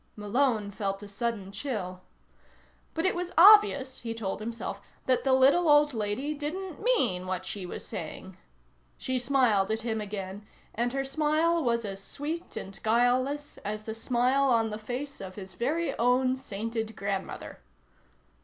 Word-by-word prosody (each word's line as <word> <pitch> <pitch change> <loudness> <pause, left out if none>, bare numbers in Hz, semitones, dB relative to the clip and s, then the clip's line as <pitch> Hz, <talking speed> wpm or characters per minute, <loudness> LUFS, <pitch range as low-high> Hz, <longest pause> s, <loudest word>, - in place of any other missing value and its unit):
Malone 215 0 0
felt 195 0 -3
a - - -8
sudden 205 -1 -3
chill. 200 -5 -4 0.9
But 325 +2 0
it 375 - +3
was 360 0 -3
obvious, 360 -9 +7
he 230 -1 -4
told 205 -4 -3
himself, 230 +2 -5 0.2
that 255 -1 +2
the 270 - +2
little 275 +6 +5
old 295 -1 +5
lady 225 +7 -2
didn't 315 +4 -5
mean 245 - +2
what 185 0 -2
she 190 -2 -5
was - - -7
saying. - - -7 0.6
She 260 -1 -2
smiled 240 -6 +3
at 220 0 -1
him 220 -2 -1
again, 200 -1 -6 0.3
and 240 +2 0
her 270 +1 -1
smile 310 +4 +2
was 235 -2 +1
as 195 -1 -6
sweet 315 - -5
and 195 0 -6
guileless 250 +6 +1
as 210 +1 -4
the 220 - -5
smile 250 +4 +2
on 230 -4 +2
the 210 - -4
face 255 +5 -5
of 185 -1 -7
his 190 -2 -9
very 310 +8 -1
own 255 +2 +3
sainted 225 -2 -4
grandmother. 195 0 -4
240 Hz, 155 wpm, -28 LUFS, 205-280 Hz, 0.9 s, obvious